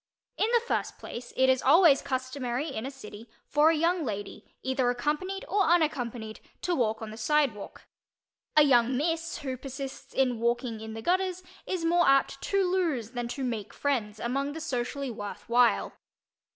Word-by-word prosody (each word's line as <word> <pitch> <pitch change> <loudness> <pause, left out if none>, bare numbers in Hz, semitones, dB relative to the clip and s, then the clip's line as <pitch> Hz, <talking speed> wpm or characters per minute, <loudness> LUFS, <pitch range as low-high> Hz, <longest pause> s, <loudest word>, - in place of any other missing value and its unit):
In 435 - +1
the 470 - +4
first - - -2
place, 240 0 -8
it 260 - +4
is 260 -1 +3
always 300 0 +6
customary 260 +1 -3
in 255 -2 -4
a - - -3
city 230 -4 -11 0.2
for 300 +2 +4
a 330 - +3
young 335 +2 +1
lady, 205 -5 -6
either 260 -1 +1
accompanied 300 +10 -2
or 400 +4 +1
unaccompanied, 245 -10 0 0.2
to 360 - 0
walk 220 -4 0
on 215 - -6
the 220 - -9
sidewalk. 250 -3 0 0.7
A 300 - +9
young 250 -2 +4
"miss" 330 +3 -1
who 265 -3 -4
persists 270 +1 -7
in 250 -3 +2
walking 235 -1 -1
in 220 0 -7
the 225 - -7
gutters 370 +2 0 0.2
is 360 -3 -2
more 345 +1 +3
apt 275 0 +3
to 395 -1 +1
lose 325 - 0
than 240 -1 -3
to 265 +3 -4
make 230 -5 -4
friends 225 -7 -1
among 275 +5 -1
the 320 - -6
socially 270 -2 -3
"worth 205 -2 -7
while." 240 +1 +3
265 Hz, 175 wpm, -28 LUFS, 235-315 Hz, 0.7 s, A